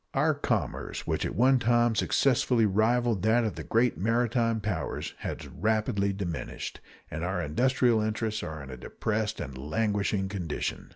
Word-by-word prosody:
Our - - +3
commerce, - - -2
which - - -1
at - - -6
one 130 +2 +5
time 120 0 +3
successfully 125 0 +2
rivaled 110 +1 +2
that 110 +3 +3
of 110 -4 -1
the 80 - -7
great 115 +9 +1
maritime 115 +2 +1
powers, 100 -6 -3
has - - -5
rapidly 105 -1 0
diminished, 95 -5 -5 0.3
and - - -4
our - - -1
industrial 120 - +2
interests 110 0 -1
are 80 -3 -6
in 70 - -9
a 65 - -7
depressed 110 - -2
and 65 - -5
languishing 100 +6 0
condition. 90 -6 -4
110 Hz, 155 wpm, -28 LUFS, 95-115 Hz, 0.3 s, one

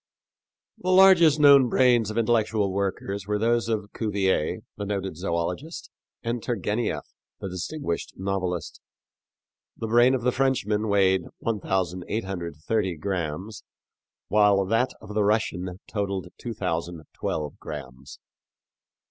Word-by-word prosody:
The 185 - -3
largest 185 -5 +7
known 140 -3 +7
brains 120 -4 +4
of 110 - -5
intellectual 110 -3 +1
workers 100 0 -3
were 105 0 0
those 115 +1 +1
of 105 -2 -2
Cuvier, 100 -7 0
the 105 - -5
noted 95 -2 -2
zoölogist, 90 - -3 0.3
and 115 0 -2
Turgenieff, 105 - -2 0.3
the 95 - -5
distinguished 90 - -4
novelist. 90 -3 -3 1.0
The - - -4
brain 120 +3 +5
of 125 - -3
the 125 - +3
Frenchman 115 -5 0
weighed 95 -2 +3 0.2
1830 95 -2 -2
grams, 95 +3 -4 0.6
while 105 -2 +4
that 115 +6 +2
of 105 - -9
the 105 0 +2
Russian 95 -4 0
totaled 100 -3 -3
2012 85 - -4
grams. 65 0 -9
100 Hz, 110 wpm, -25 LUFS, 90-115 Hz, 1.0 s, largest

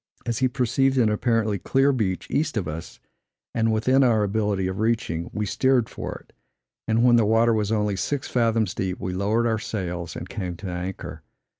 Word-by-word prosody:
As 115 -1 -1
he 130 - +3
perceived 130 +1 +1
an 115 -4 +4
apparently 110 -2 +1
clear 135 +8 +2
beach 105 -8 -1
east 150 -4 0
of 95 -6 -1
us, 80 +2 -7 0.5
and 115 -1 +1
within 130 +5 +3
our 115 -4 +3
ability 105 -2 0
of 95 +1 -3
reaching, 110 -7 -1
we 105 0 -2
steered 130 +2 +2
for - - -6
it; - - -28 0.5
and 115 +1 +2
when 120 -1 +6
the 115 - +4
water 115 +2 +4
was 105 -1 0
only 105 -2 +1
six 140 +8 -2
fathoms 115 -4 +1
deep, 95 -1 -3
we 90 - -3
lowered 105 +5 +1
our 110 -2 +1
sails 90 -6 -4
and 85 - -6
came 90 -5 -4
to 95 - -7
anchor. 90 +2 -6
110 Hz, 190 wpm, -24 LUFS, 95-120 Hz, 0.5 s, when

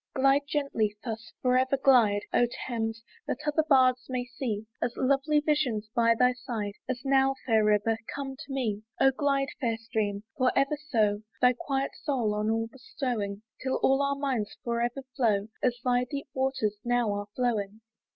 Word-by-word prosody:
Glide 275 +2 +3
gently, 230 -8 0
thus 225 -1 -6
for 250 -1 +3
ever 260 +1 +1
glide, 230 -7 +4
O 240 - +4 0.2
Thames! 225 -2 -3 0.2
that - - -1
other 300 +1 +2
bards 255 -3 +4
may 250 -1 -2
see, 235 -4 -4 0.2
As 240 - -1
lovely 275 +3 +2
visions 260 -9 0
by 230 -1 +4
thy 250 +1 +4
side 235 -6 -4 0.2
As 255 0 -3
now, 270 0 +3
fair 220 -3 +3
river! 210 +1 +2 0.2
come 275 -1 -4
to 285 +1 -10
me. 225 -6 -1 0.2
Oh 270 - +6
glide, 275 0 0
fair 230 -5 0
stream! 215 -3 -2
for 255 -1 +3
ever 275 +2 +2
so; 210 -5 +2 0.2
Thy 250 0 +5
quiet 275 -1 -2
soul 245 -7 0
on 210 +1 0
all 225 0 +1
bestowing, 230 - -4 0.2
'Till 260 0 -1
all 270 +1 +4
our 280 0 +1
minds 265 -7 -2
for 235 -1 -1
ever 245 +3 -2
flow, 215 -5 +1
As 245 -1 +1
thy 250 0 +2
deep 280 -1 -5
waters 260 -6 -1
now 240 -3 +1
are 205 0 -4
flowing. 220 -4 -1
250 Hz, 175 wpm, -28 LUFS, 220-270 Hz, 0.2 s, Oh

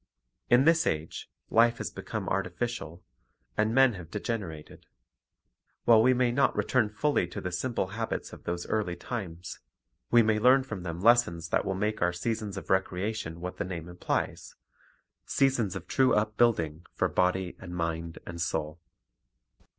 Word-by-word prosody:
In 125 +3 +5
this 165 0 +4
age, 80 +1 -3 0.2
life 115 +1 +5
has - - -4
become - - -5
artificial, 95 -2 -3 0.5
and 110 +8 +2
men 130 0 +5
have 85 -5 -9
degenerated. 100 -7 -5 1.0
While 115 -2 +7
we 125 +3 +5
may 125 -1 +2
not 135 +3 +2
return 125 -5 +2
full) 115 +6 +1
to - - -6
the 90 - -4
simple 95 +1 -2
habits 110 +3 -4
of - - -11
those 85 0 -3
early 105 -5 -1
times, 90 -8 -6 0.5
we 120 -1 +6
may 110 0 +2
learn 130 +4 +5
from 115 -8 -6
them 85 -1 -5
lessons 95 -8 +3
that - - +1
will 95 - -1
make 105 +3 -1
our 90 0 +2
seasons 105 +2 -3
of - - -6
recreation 95 -2 -1
what 90 +1 -5
the - - -1
name 85 -2 -6
implies, 90 0 -3 0.4
— - - -37 0.3
seasons 125 -8 +1
of 90 -1 -7
true 130 -2 +3
upbuilding 105 -7 +1
for - - +2
body 90 0 0
and 90 -1 -8
mind 85 -1 -3
and 85 -1 -6
soul. 80 0 -2
95 Hz, 160 wpm, -29 LUFS, 85-115 Hz, 1.0 s, While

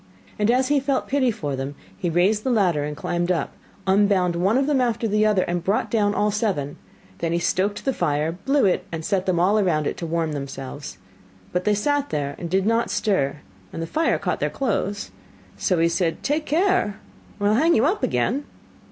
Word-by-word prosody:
And 210 +1 +2
as 255 +2 +3
he 290 -1 +4
felt 275 0 -1
pity 270 -2 +2
for 145 - -3
them, 135 +2 -5 0.2
he 170 - -2
raised 190 +6 +2
the - - 0
ladder, 185 - +2
and 150 0 -4
climbed 175 +3 -1
up, 165 -5 -1 0.3
unbound 190 -2 +3
one 190 +7 +2
of 270 - +2
them 285 -3 +2
after 235 -2 0
the 215 +1 +2
other, 200 -4 +3
and 175 -1 -2
brought 195 +4 0
down 205 -2 +2
all 210 +1 +2
seven. 195 -10 -1 0.4
Then 165 0 -1
he - - +2
stoked 190 +4 0
the 270 - +1
fire, 150 -4 0
blew 255 +11 +1
it, 185 - +2
and 165 -1 -5
set 190 -1 0
them 180 -2 +2
all 200 +5 +3
round 155 -5 +1
it - - -2
to 170 - -4
warm 165 -1 -1
themselves. 140 -3 -6 0.6
But 180 0 -1
they 210 -1 +3
sat 290 +6 0
there 140 -1 -2
and 170 - -5
did 190 +2 +1
not 230 +2 +1
stir, 150 -9 0 0.3
and - - -6
the 165 - -2
fire 320 - +1
caught - - -2
their - - 0
clothes. 205 -5 -2 0.4
So 185 - 0
he 165 0 +3
said: 170 0 -1
'Take 300 +2 -1
care, 345 - +1 0.4
or 205 - -1
I - - +4
will 215 - +3
hang 325 +5 +4
you 225 - +3
up 370 +8 +1
again. 230 - 0
195 Hz, 215 wpm, -23 LUFS, 165-230 Hz, 0.6 s, he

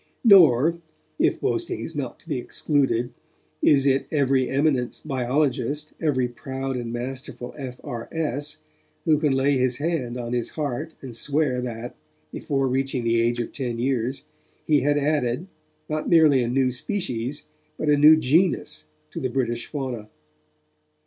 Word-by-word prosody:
Nor, 170 - +6 0.4
if - - +2
boasting - - -1
is - - -6
not - - -4
to - - -26
be - - -2
excluded, 130 -5 0 0.5
is 140 -2 +4
it 135 -1 +2
every 135 -3 +2
eminent 135 -3 +1
biologist, 140 +1 -1
every 130 -6 +1
proud 135 +2 -5
and 120 -2 -4
masterful 125 0 -6
F.R.S., 145 +2 -5 0.5
who 155 -2 +4
can 150 -2 +2
lay 135 +1 +2
his 125 -1 +1
hand 145 -6 -2
on 120 -1 -4
his 120 -1 -1
heart 150 +2 -3
and 125 -4 -7
swear 140 0 0
that, 120 -1 -6 0.4
before 135 -2 -1
reaching 130 -1 -1
the 115 0 +2
age 120 +1 +1
of 120 - -3
ten 125 -4 -3
years, 130 +1 -1 0.4
he 150 -2 +4
had 145 +2 +2
added, 145 -1 0 0.4
not 155 0 -2
merely 155 -6 +6
a 120 - 0
new 130 +1 +2
species, 130 - -3 0.3
but 155 - -3
a 150 - +5
new 150 +2 +7
genus 155 - +1 0.3
to - - -5
the 130 - -1
British 120 -2 -2
fauna. 125 -7 -5
135 Hz, 150 wpm, -24 LUFS, 125-150 Hz, 0.5 s, new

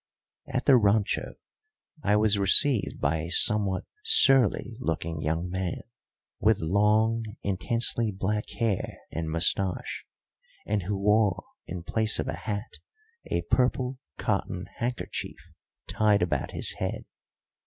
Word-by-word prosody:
At 130 -1 -3
the 135 -3 +6
rancho 105 -1 0 0.7
I 105 -4 +2
was 105 -1 +3
received 110 +5 +4
by 75 +3 0
a 80 +2 -5
somewhat 100 0 +5 0.2
surly 135 - +3
looking 80 -6 -3
young 80 +3 -2
man, 95 -2 -3 0.6
with 110 0 +3
long, 105 +6 +2 0.2
intensely 115 +4 0
black 105 +2 -3
hair 110 -5 -2
and 80 0 -4
moustache, 90 +3 -1 0.6
and 105 0 -1
who 100 +3 -3
wore 105 -1 +2 0.2
in 90 0 -6
place 110 +4 +1
of - - -3
a - - -3
hat 105 +1 -6 0.5
a 85 - -2
purple 125 +5 0 0.2
cotton 90 +1 -2
handkerchief 120 +1 -4 0.5
tied 105 -3 +2
about 90 - -2
his - - 0
head. - - -4
105 Hz, 120 wpm, -27 LUFS, 90-115 Hz, 0.7 s, the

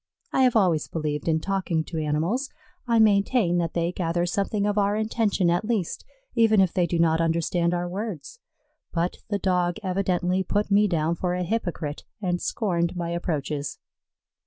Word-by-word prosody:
I - - +3
have 255 -2 +4
always 180 -8 +3
believed 150 -2 -3
in 160 -1 +2
talking 185 -4 -1
to 160 0 -5
animals. 165 - -1 0.4
I 235 -1 +3
maintain 200 -3 +3
that 165 -2 -2
they 170 0 +1
gather 175 -1 -1
something 200 +3 -1
of 205 0 +1
our 200 +1 +2
intention 215 -4 +1
at 175 - +1
least, 215 -6 -2 0.3
even 225 -3 +4
if 190 -3 +3
they 180 -2 +2
do 170 - -1
not 165 -1 +3
understand 170 +1 +1
our 175 0 -2
words; 205 - -6 0.5
but 175 +1 -1
the 205 - 0
Dog 180 -2 +1
evidently 185 -1 0
put 205 +2 -1
me 205 +1 +5
down 165 -3 +1
for 180 +1 -1
a 180 - -1
hypocrite 175 -7 -3 0.2
and 180 -3 -1
scorned 175 -5 -1
my 170 -1 -3
approaches. 150 -4 -3
180 Hz, 170 wpm, -25 LUFS, 170-205 Hz, 0.5 s, me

